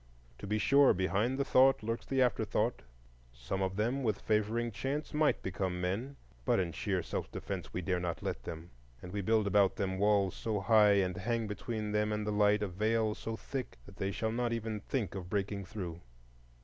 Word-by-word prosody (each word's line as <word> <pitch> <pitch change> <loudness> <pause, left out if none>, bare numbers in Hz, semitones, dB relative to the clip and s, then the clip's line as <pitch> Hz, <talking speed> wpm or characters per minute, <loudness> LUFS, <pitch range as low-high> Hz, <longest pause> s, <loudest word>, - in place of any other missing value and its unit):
To - - -7
be 105 +2 +1
sure, 140 +6 +5
behind 100 +7 +1
the 140 - 0
thought 130 -2 +5
lurks 115 +2 -3
the 135 -1 +3
afterthought,—some - - -3
of 95 0 -1
them 120 +7 0
with 110 -5 0
favoring 110 +2 0
chance 135 +9 -3
might 150 0 +2
become 95 -1 -2
men, 100 +10 -2 0.3
but - - +2
in 90 -3 0
sheer 95 0 -1
self - - -4
defence - - -5
we 90 - -3
dare 90 0 0
not 90 -1 -3
let - - -3
them, 80 +1 -8 0.3
and 90 - -7
we 100 - -1
build 110 +2 +2
about 100 -1 +3
them 95 -2 -2
walls 100 -2 +3
so 110 -3 -2
high, 105 0 +5
and 95 -3 +1
hang 115 +3 -1
between 105 +1 -4
them 105 0 +1
and 105 0 -1
the 105 - -1
light 105 0 +3
a - - 0
veil 110 +3 +1
so 115 +1 -5
thick, 130 +1 -5
that 100 - -14
they 95 - -1
shall 110 +3 -2
not 120 +1 -1
even 110 -2 -2
think 105 - -2
of 90 -2 -6
breaking 100 0 -2
through. 90 -4 -6
105 Hz, 200 wpm, -32 LUFS, 95-115 Hz, 0.3 s, sure